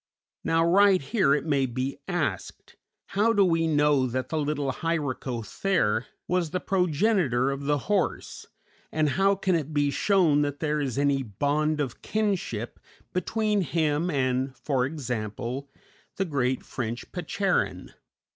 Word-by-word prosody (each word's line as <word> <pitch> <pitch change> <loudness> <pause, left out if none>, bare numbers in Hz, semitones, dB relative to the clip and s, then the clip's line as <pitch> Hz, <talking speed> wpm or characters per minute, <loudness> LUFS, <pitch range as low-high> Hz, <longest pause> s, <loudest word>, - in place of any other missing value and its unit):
] - - -68
Now 165 0 +2
right 195 +2 +5
here 140 - +2
it 150 - -2
may 140 -4 +1
be 130 +3 -3
asked, 150 - -3 0.3
How 215 +3 +2
do 200 -3 +4
we 165 -2 +2
know 145 -3 +3
that 130 +1 -3
the 160 - -1
little 145 -2 -1
Hyracothere 130 - -1 0.2
was 180 -3 0
the 185 - -2
progenitor 180 - +1
of 140 +1 -5
the 145 0 +2
horse, 200 -3 -1 0.4
and 155 -1 +1
how 195 +6 +3
can 190 -1 0
it 155 -2 -1
be 145 -1 +2
shown 170 -5 +3
that 145 -1 -2
there 150 -1 0
is 135 -3 -2
any 140 -1 +2
bond 145 +7 0
of 135 -5 -3
kinship 195 - -2 0.3
between 210 +2 0
him 160 +1 0
and, 130 -2 0
for 130 0 0
example, 125 -1 -4 0.5
the 195 - 0
great 130 -5 -1
French 120 -1 -5
Percheron? 185 +2 -1
150 Hz, 145 wpm, -26 LUFS, 130-180 Hz, 0.5 s, right